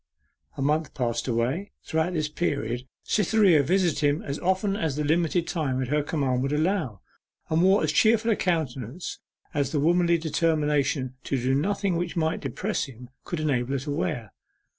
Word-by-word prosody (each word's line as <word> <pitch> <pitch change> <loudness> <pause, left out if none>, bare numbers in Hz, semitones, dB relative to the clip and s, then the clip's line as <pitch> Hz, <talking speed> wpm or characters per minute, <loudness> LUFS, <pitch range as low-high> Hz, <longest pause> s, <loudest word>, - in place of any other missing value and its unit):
A 135 - -1
month 150 +2 0
passed 120 -3 -1
away; 130 - -1
throughout 160 +3 0
this 155 -3 0
period, 130 -6 -2 0.2
Cytherea 200 -6 +4
visited 175 +2 +1
him 145 +1 +1
as 140 0 -4
often 190 +2 +1
as 160 -8 -1
the 150 - -1
limited 165 +2 +1
time 140 -7 -1
at 130 -2 -2
her 150 +1 +2
command 135 -4 0
would 135 +1 -1
allow, 155 - 0 0.5
and 160 +1 +3
wore 190 +1 +4
as 155 - +1
cheerful 225 +7 +4
a - - +3
countenance 155 - -2 0.3
as 140 -3 0
the 150 - 0
womanly 170 +3 +3
determination 150 -4 0
to 135 - 0
do 130 +2 +1
nothing 195 +5 0
which 175 0 -3
might 160 -1 0
depress 210 +2 -2
him 125 -2 -12
could 175 - -3
enable 135 -4 0
her - - +1
to 145 +1 -4
wear. 140 - -2
155 Hz, 175 wpm, -26 LUFS, 135-175 Hz, 0.5 s, Cytherea